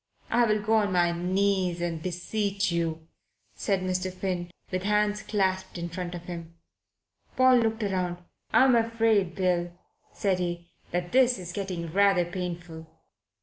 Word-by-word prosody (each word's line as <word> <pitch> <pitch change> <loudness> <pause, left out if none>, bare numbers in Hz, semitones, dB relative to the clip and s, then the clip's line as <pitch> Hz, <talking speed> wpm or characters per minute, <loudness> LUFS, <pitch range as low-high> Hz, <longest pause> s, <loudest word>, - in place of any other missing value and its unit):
I 240 0 +4
will 215 -1 +2
go 220 +1 +3
on 205 -2 +1
my 175 -1 +3
knees 185 0 0
and 170 -2 -2
beseech 195 +2 -1
you," 165 -1 -2 0.5
said 195 -3 -1
Mr. 185 0 -1
Finn, 180 -2 -3 0.2
with 185 0 -1
hands 210 +1 +1
clasped 190 -3 -1
in 170 0 -4
front 175 +1 -5
of 175 - -7
him. 170 -2 -8 0.8
Paul 255 0 +6
looked 225 -1 +1
round. 185 -3 -1 0.3
"I'm 260 -1 +6
afraid, 225 -5 +2
Bill," 180 -2 +1 0.4
said 190 -3 0
he, 175 -1 -4 0.2
"that 175 0 -2
this 255 -1 +4
is 175 -2 -7
getting 180 -5 -4
rather 195 -2 +4
painful." 175 -2 -6
185 Hz, 145 wpm, -27 LUFS, 175-205 Hz, 0.8 s, Paul